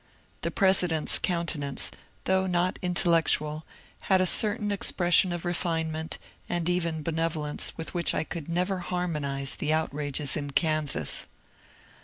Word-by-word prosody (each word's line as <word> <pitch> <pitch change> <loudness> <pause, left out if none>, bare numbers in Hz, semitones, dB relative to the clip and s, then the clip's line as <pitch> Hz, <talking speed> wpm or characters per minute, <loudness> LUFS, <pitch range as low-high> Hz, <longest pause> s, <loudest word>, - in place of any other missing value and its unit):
The - - -1
President's 180 -5 +2
countenance, 165 -6 -1 0.3
though 190 0 +2
not 180 0 0
intellectual, 165 -4 +2 0.4
had 190 -1 +5
a 185 - +3
certain 205 +2 +3
expression 180 -2 +3
of 175 0 -4
refinement 160 -2 -2 0.3
and 175 -1 -1
even 170 -3 -1
benevolence 160 -2 -1
with 165 - -5
which 175 -2 +1
I - - 0
could 160 -1 -7
never 180 +3 0
harmonize 150 -7 -1
the 155 - -2
outrages 145 -2 -1
in 145 -2 -4
Kansas. 155 - +1
165 Hz, 125 wpm, -27 LUFS, 155-180 Hz, 0.4 s, had